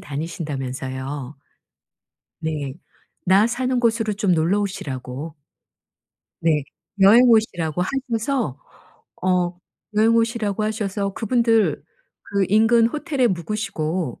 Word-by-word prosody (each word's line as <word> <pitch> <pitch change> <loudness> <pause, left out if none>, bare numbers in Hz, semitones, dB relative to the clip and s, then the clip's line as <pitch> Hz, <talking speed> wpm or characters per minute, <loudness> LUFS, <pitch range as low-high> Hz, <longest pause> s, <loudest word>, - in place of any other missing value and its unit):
다니신다면서요. 140 -3 -5 1.0
네. 150 -4 -3 0.5
나 195 +4 +5
사는 250 +2 -1
곳으로 225 -2 +1
좀 200 -2 +1
놀러 175 +5 +2
오시라고 145 -5 -5 1.1
네. 155 -3 +2 0.4
여행 210 +6 +8
오시라고 180 -8 +2
하셔서 235 - -2 0.6
어 180 -1 +1 0.4
여행 220 +2 +4
오시라고 225 -3 0
하셔서 205 -2 -2
그분들 230 -1 +2 0.4
그 200 -1 0
인근 225 +3 +5
호텔에 290 -1 0
묵으시고 180 - -3
195 Hz, 230 characters per minute, -22 LUFS, 155-225 Hz, 1.1 s, 여행